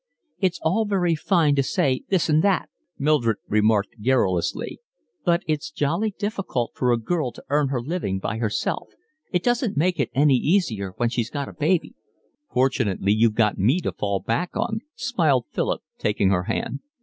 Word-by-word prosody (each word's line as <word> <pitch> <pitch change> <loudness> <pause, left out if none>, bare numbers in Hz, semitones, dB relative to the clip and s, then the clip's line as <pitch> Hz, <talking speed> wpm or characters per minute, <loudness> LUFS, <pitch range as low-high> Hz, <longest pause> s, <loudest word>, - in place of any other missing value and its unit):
"It's 180 -4 0
all 190 +8 +2
very 185 -5 +1
fine 160 -2 +2
to - - +5
say 130 -1 +1
this 190 -4 +2
and 155 0 +3
that," 200 -3 +1 0.3
Mildred 135 -7 +2
remarked 105 0 +2
querulously, 100 -9 0 0.4
"but 170 -1 +2
it's 155 -2 -1
jolly 170 +9 -1
difficult 195 - -2
for 125 -1 +1
a 120 - +3
girl 135 +2 -1
to - - -13
earn 145 -1 +3
her 130 -3 -2
living 150 - -2
by 105 +3 -3
herself; 110 -2 -1 0.4
it 180 -2 0
doesn't 245 - 0
make 175 +2 +1
it 135 - +1
any 140 -1 +5
easier 120 - 0
when 120 -1 +1
she's 115 -1 -2
got 140 -1 -4
a - - -11
baby." 165 +3 0 0.6
"Fortunately 120 -7 +1
you've 110 +1 +3
got 110 -3 +2
me 125 - +3
to - - -2
fall 100 -1 -2
back 120 - -2
on," 220 -1 -1 0.2
smiled 165 - +1
Philip, - - -1 0.2
taking 105 -2 +1
her 90 -2 +1
hand. 230 - -2
140 Hz, 175 wpm, -24 LUFS, 115-175 Hz, 0.6 s, to